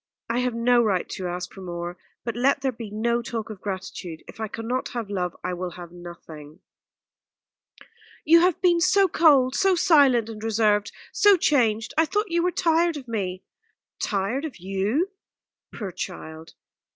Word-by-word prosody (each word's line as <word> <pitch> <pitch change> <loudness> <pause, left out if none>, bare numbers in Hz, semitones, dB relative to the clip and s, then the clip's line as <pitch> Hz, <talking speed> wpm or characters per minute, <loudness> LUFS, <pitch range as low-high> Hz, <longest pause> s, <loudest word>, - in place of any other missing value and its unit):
I 240 - 0
have 250 -2 -1
no 240 +1 +4
right 200 -6 0
to 185 -3 -4
ask 180 +1 -5
for 195 - -11
more 175 -1 -5 0.3
but 235 -1 -4
let 270 +3 +2
there 265 -1 0
be 230 -3 -8
no 235 +3 0
talk 225 -2 -5
of 200 -3 -10
gratitude 185 -4 -6
if - - -13
I 220 - -2
cannot 235 +4 -3
have 220 -4 -4
love 180 -3 -2
I 180 - -2
will 180 +1 -4
have 175 -1 -9
nothing." 165 -4 -11 1.6
"You 335 +2 +7
have 355 0 +2
been 350 -2 +4
so 390 +2 +4
cold, 285 -7 +4
so 385 +4 +3
silent 285 - +4
and 220 -1 -8
reserved, 215 -2 +2 0.2
so 410 -2 +6
changed. 230 -9 +1
I 320 - +5
thought 415 +5 -1
you 340 0 +2
were 360 - +2
tired 335 -1 +2
of 265 -3 -10
me." 190 -5 -3 0.6
"Tired 205 +7 -1
of 315 -4 -6
you? 195 - -1 0.6
Poor 200 -4 -6
child! 160 -1 -8
225 Hz, 170 wpm, -24 LUFS, 190-285 Hz, 1.6 s, You